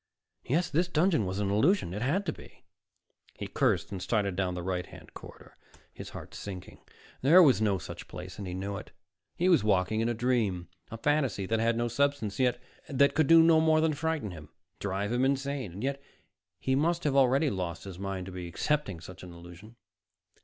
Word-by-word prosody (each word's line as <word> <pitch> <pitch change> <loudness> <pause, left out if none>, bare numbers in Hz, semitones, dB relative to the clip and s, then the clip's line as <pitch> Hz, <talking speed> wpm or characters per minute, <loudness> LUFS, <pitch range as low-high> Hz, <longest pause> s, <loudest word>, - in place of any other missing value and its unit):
Yes, 170 +7 +1
this 170 +4 +2
dungeon 160 - +2
was 95 +1 -3
an 100 -1 0
illusion. 120 - +2
It 105 - -4
had 165 +11 0
to 160 - -1
be. - - -16 0.7
He - - -6
cursed 85 -1 0
and 95 -2 -5
started 100 -4 0
down 90 -1 -1
the 90 - -5
right 90 -1 -2
hand - - -14
corridor, - - -13 0.4
his - - -9
heart - - -10
sinking. 95 -3 -8 0.4
There 170 +8 +7
was 130 - +4
no 105 -3 +2
such - - -9
place 90 +2 -9
and 100 - -5
he 90 - -5
knew 100 +2 -4
it. 105 - -9 0.5
He 180 - +1
was 175 - +5
walking 105 +1 +1
in 115 +1 +1
a 120 - -1
dream, 110 -8 0 0.2
a 115 - -7
fantasy 135 -6 0
that 110 +3 0
had 115 +1 +1
no 120 0 0
substance, 130 -4 0 0.5
that 140 0 +3
could 155 -2 +2
do 165 +1 +8
no 165 -1 +5
more 160 0 +4
than 160 0 +2
frighten 150 -7 -2
him, 75 -3 -11 0.3
drive 100 +1 -2
him 120 +1 +1
insane; 135 -7 -2
yet 140 +1 -2 0.6
he 130 - 0
must 165 +5 +1
already 135 0 +3
have 140 - 0
lost 85 -3 -4
his 95 -3 -9
mind 95 -2 -4
to 95 - -8
be 90 -1 -6
accepting 100 - -1
such 90 +1 -11
an 90 - -10
illusion. 85 +6 -13
115 Hz, 200 wpm, -29 LUFS, 95-145 Hz, 0.7 s, do